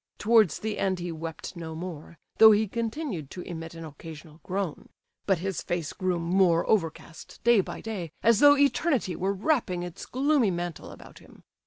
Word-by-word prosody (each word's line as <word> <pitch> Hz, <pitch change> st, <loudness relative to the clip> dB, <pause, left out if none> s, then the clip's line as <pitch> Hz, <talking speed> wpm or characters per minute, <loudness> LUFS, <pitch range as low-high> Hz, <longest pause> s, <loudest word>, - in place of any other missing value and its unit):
Towards 220 Hz, -6 st, +4 dB
the 215 Hz, -1 st, -4 dB
end 190 Hz, -1 st, 0 dB
he 175 Hz, -1 st, -5 dB
wept 165 Hz, +2 st, -7 dB
no 165 Hz, -2 st, -7 dB
more, 165 Hz, -1 st, -8 dB, 0.2 s
though 220 Hz, -, +10 dB
he 215 Hz, +1 st, +3 dB
continued 225 Hz, -, -4 dB
to 180 Hz, -, -8 dB
emit 165 Hz, -2 st, -7 dB
an 165 Hz, 0 st, -8 dB
occasional 155 Hz, +1 st, -11 dB
groan; 190 Hz, -4 st, -4 dB, 0.4 s
but 195 Hz, -2 st, +3 dB
his 190 Hz, +1 st, -3 dB
face 175 Hz, -4 st, -3 dB
grew 185 Hz, -2 st, -1 dB
more 170 Hz, 0 st, +2 dB
overcast 165 Hz, -4 st, -2 dB
day 235 Hz, -3 st, +5 dB
by -, -, -8 dB
day, 195 Hz, -8 st, -5 dB
as 230 Hz, -2 st, +5 dB
though 290 Hz, 0 st, +7 dB
Eternity 280 Hz, -, +1 dB
were 190 Hz, +2 st, -1 dB
wrapping 200 Hz, -, 0 dB
its 175 Hz, 0 st, -8 dB
gloomy 270 Hz, -3 st, +2 dB
mantle 175 Hz, -2 st, -4 dB
about -, -, -13 dB
him. -, -, -18 dB
185 Hz, 175 wpm, -27 LUFS, 165-220 Hz, 0.4 s, though